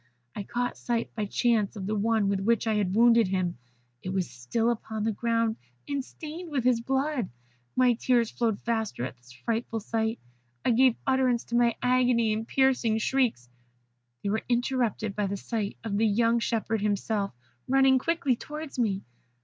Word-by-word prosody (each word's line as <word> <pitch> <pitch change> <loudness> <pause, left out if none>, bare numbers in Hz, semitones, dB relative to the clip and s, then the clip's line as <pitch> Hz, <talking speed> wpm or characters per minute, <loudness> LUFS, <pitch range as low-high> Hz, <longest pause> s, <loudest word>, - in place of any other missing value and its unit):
I - - -3
caught 245 +5 -2
sight 235 -1 -2
by 215 -2 -2
chance 225 -1 +1
of 195 -3 -5
the 210 - -1
one 215 0 +1
with 195 -1 +1
which 230 +4 +1
I 220 - +1
had 200 -3 0
wounded 230 -1 +5
him. 185 -6 -1 0.4
It 185 - -5
was 190 -1 -1
still 225 - 0
upon 220 -2 -4
the 220 - +1
ground, 230 +1 0 0.3
and 280 -2 -2
stained 320 +5 -8
with 280 -5 -1
his 245 -2 +3
blood. 265 -2 -1 0.5
My 250 -1 +5
tears 235 -1 +1
flowed 225 -4 0
faster 220 - -1
at 130 - -6
this 120 +1 -19
frightful 225 - -3
sight. 220 +1 -1 0.5
I - - +4
gave 250 0 +5
utterance 260 -3 +2
to 235 - -4
my 235 -1 +3
agony 250 -3 +3
in 220 +1 -3
piercing 255 -5 +2
shrieks. 225 - 0 0.8
They - - -1
were 220 - 0
interrupted 240 -4 0
by 210 -1 0
the 200 +1 -3
sight 210 0 -3
of 220 -3 -2
the 225 - +4
young 230 +3 +3
shepherd 225 -2 -1
himself, 205 0 0 0.4
running 265 0 +5
quickly 305 -3 +1
towards 300 +2 -7
me. 200 -5 0
230 Hz, 175 wpm, -28 LUFS, 210-250 Hz, 0.8 s, wounded